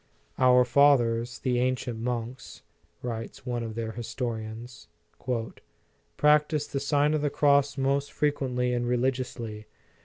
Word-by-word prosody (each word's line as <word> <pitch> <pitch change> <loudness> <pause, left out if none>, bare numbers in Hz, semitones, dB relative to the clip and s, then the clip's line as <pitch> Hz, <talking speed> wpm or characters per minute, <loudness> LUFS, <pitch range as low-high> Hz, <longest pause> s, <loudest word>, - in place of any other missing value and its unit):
" - - -38
Our 125 0 +6
fathers, 120 -3 +3
the 125 -2 0
ancient 125 -2 -1
monks," 125 +2 -5 0.4
writes 115 0 -6
one 120 -2 -2
of 115 -1 -5
fheir 115 -1 -4
historians, 115 0 -6 1.3
"practised 150 0 +2
the 140 - 0
Sign 145 +1 +2
of 155 - 0
the 145 - +1
Cross 140 0 +3
most 135 +1 0
frequently 125 -4 0
and 120 0 -1
religiously. 120 -3 -2
125 Hz, 125 wpm, -27 LUFS, 120-140 Hz, 1.3 s, Our